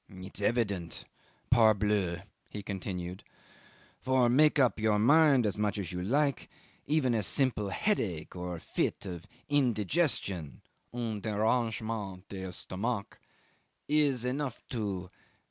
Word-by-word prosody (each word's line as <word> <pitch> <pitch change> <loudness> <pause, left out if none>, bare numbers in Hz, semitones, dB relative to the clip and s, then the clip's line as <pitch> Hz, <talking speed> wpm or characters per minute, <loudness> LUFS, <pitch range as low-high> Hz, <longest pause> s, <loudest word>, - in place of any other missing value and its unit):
"It's 95 0 -7
evident 100 -6 -1 0.5
parbleu!" 105 -6 +3 0.3
he 105 - -7
continued; 95 -2 -5 0.8
"for, 130 -2 +3
make 150 +5 +5
up 130 -5 +3
your 110 -1 +2
mind 140 +2 +5
as 105 0 -1
much 105 -1 0
as 95 -5 -4
you 90 -1 -4
like, 140 +7 0 0.4
even 145 -4 +2
a 110 - +1
simple 105 -1 +1
headache 100 - -1
or 90 -1 -4
a - - -8
fit - - -2
of 90 0 -7 0.2
indigestion 120 - 0 0.3
(un 115 -4 -3
derangement 110 -3 -1
d'estomac) 100 +3 -4 0.7
is 145 -5 +2
enough 130 0 -3
to 100 -6 -3
105 Hz, 115 wpm, -30 LUFS, 95-125 Hz, 0.8 s, make